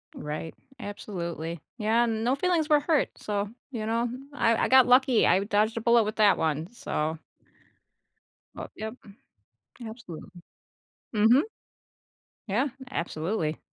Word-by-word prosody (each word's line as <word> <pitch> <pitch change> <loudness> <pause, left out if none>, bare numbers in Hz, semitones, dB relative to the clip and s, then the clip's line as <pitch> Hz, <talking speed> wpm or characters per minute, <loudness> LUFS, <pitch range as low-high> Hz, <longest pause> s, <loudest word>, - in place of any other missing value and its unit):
Right, 150 +2 -5 0.3
absolutely, 170 -5 -5 0.2
yeah, 225 +3 +3
no 230 +3 0
feelings 330 -1 +1
were 300 -1 +6
hurt, 300 0 +1
so, 205 -1 -2 0.2
you 220 -3 -4
know, 230 +1 +1 0.2
I 230 -5 +2
I - - +1
got 260 -1 +7
lucky, 255 -1 +5
I 195 - +4
dodged 210 +2 +1
a 230 - -1
bullet 235 0 +5
with 215 +1 -4
that 210 -2 +5
one, 160 +4 -1
so 160 -8 -3 1.4
But, - - -8
yep. 220 +1 -5 0.9
Absolutely. 220 -8 -9 0.9
Mhm. 225 +6 +5 1.1
Yeah, 240 +9 +1 0.2
absolutely. 165 - -2
220 Hz, 120 wpm, -27 LUFS, 180-240 Hz, 1.4 s, got